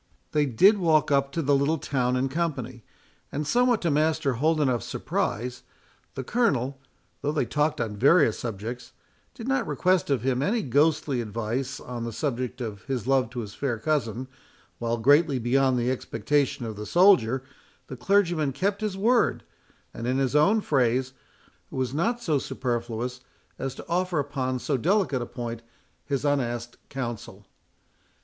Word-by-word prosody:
They 150 -1 +2
did 195 - +5
walk 160 -4 +3
up 140 0 +2
to 165 - -1
the 140 0 +3
little 140 +4 +2
town 125 -3 0
in 130 +1 +1
company, 135 -6 -3 0.5
and 150 +1 -3
somewhat 245 - +2
to 170 - +2
Master 150 -2 +1
Holdenough's 145 -2 +1
surprise, 125 +3 -3 0.5
the 135 - -4
Colonel, 135 - 0 0.4
though 145 - 0
they 150 -4 0
talked 150 +3 0
on 105 -2 -3
various 135 - +4
subjects, 115 +2 -6 0.4
did 230 - -7
not 265 -5 +1
request 185 -4 +1
of 135 -5 +1
him 130 -1 +1
any 215 +8 +1
ghostly 145 -1 +2
advice 115 +5 -3
on 120 -1 -6
the 115 - -4
subject 125 -1 -3
of 105 -5 -5
his 130 -5 -3
love 130 -3 +2
to 120 0 -5
his 105 -2 -8
fair 130 -5 -2
cousin, 125 -1 -1 0.5
while, 115 0 -1
greatly 145 +4 +4
beyond 130 +2 +2
the 120 +1 +1
expectation 130 +1 -1
of 110 -1 -5
the 105 0 -6
soldier, 135 - +4 0.4
the 130 - -8
clergyman 170 -1 +1
kept 200 - -1
his 210 -3 -2
word, 230 +4 +2 0.5
and 115 - -5
in 130 +1 +1
his 135 +1 0
own 200 +9 +4
phrase, 130 - +1 0.6
was 130 -1 -2
not 230 +11 0
so 155 -10 0
superfluous 120 -1 -3 0.4
as 135 -1 -3
to - - -9
offer 180 0 0
upon 135 -3 -1
so 135 +2 -1
delicate 175 - +1
a 120 - -4
point 120 -1 -5 0.4
his 140 -2 -2
unasked 120 -4 -1
counsel. 115 -6 -6
135 Hz, 160 wpm, -26 LUFS, 120-155 Hz, 0.6 s, did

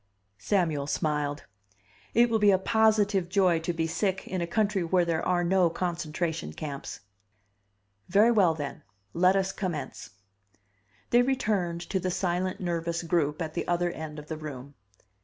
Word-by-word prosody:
Samuel 155 - 0
smiled. 150 -1 -1 0.7
"It 235 +1 +6
will 225 -1 +1
be 210 -1 +5
a 190 - +5
positive 205 -2 +2
joy 185 -3 +3
to 165 +2 -2
be 165 -1 -1
sick 190 +3 -1
in 185 -1 -3
a 170 - -2
country 205 0 +1
where 175 +1 +2
there 165 -1 -1
are 180 -1 +1
no 180 0 +3
concentration 165 - -3
camps!" 140 - -6 1.1
"Very 210 +5 +5
well, 190 -8 +4
then. 145 -3 -6 0.3
Let 185 +2 +4
us 195 -1 +1
commence." 165 -9 -5 1.0
They 240 - +6
returned 210 -10 0
to 190 +2 -2
the 185 0 -2
silent, 180 +1 -1
nervous 170 -1 -2
group 165 -2 0
at 155 -1 -6
the - - -3
other 175 0 +1
end 155 -2 -7
of 150 0 -9
the 160 - -5
room. 140 -3 -8
175 Hz, 160 wpm, -28 LUFS, 160-190 Hz, 1.1 s, It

